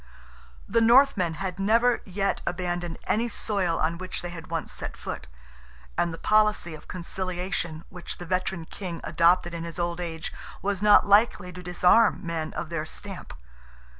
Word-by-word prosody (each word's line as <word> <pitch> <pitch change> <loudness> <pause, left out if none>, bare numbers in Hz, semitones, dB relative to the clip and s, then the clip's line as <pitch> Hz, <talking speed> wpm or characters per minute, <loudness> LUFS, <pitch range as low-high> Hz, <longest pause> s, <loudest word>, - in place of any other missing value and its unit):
The 230 +3 +2
Northmen 230 -8 +5
had 185 +2 -4
never 230 +5 +3
yet 195 +1 -1
abandoned 175 -1 -2
any 235 +3 0
soil 190 -8 0
on 165 +2 0
which 185 -1 -5
they 175 - -5
had 165 -2 -9
once 165 -1 -3
set - - -5
foot, 65 - -6 0.7
and 170 - +1
the 165 - -6
policy 215 -5 +2
of 155 - -11
conciliation 180 -2 -3
which 180 -2 -6
the 175 - -8
veteran 185 -1 -1
King 175 -1 -6
adopted 175 0 +3
in 165 -1 -4
his 170 -1 -7
old 170 0 -1
age, 160 -2 -5 0.3
was 200 -1 -1
not 210 0 +7
likely 205 -3 +3
to 180 - -8
disarm 180 +3 +4
men 165 -2 -3
of 165 - -4
their 165 -2 -2
stamp. 190 +4 -8
180 Hz, 165 wpm, -26 LUFS, 170-200 Hz, 0.7 s, not